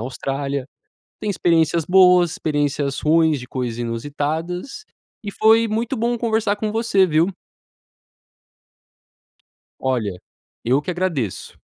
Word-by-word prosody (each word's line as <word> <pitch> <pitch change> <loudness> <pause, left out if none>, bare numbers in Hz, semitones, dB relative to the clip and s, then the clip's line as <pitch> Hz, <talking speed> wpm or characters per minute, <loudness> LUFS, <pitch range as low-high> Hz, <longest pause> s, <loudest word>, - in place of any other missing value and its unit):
Austrália. 135 +2 -3 0.5
Tem 210 - -4
experiências 165 -4 +1
boas, 180 -2 +5
experiências 145 -2 -1
ruins 160 -1 +3
de 125 - -10
coisas 125 -3 -4
inusitadas 150 - -4 0.4
e 205 - -5
foi 225 +1 +4
muito 230 +4 -1
bom 235 +1 -1
conversar 220 -3 0
com 215 0 -2
você, 220 -3 +2
viu? 160 +3 +2 2.5
Olha, 110 -9 -1 0.4
eu 130 +4 +2
que - - -4
agradeço. 170 - -3
160 Hz, 105 wpm, -21 LUFS, 135-205 Hz, 2.5 s, boas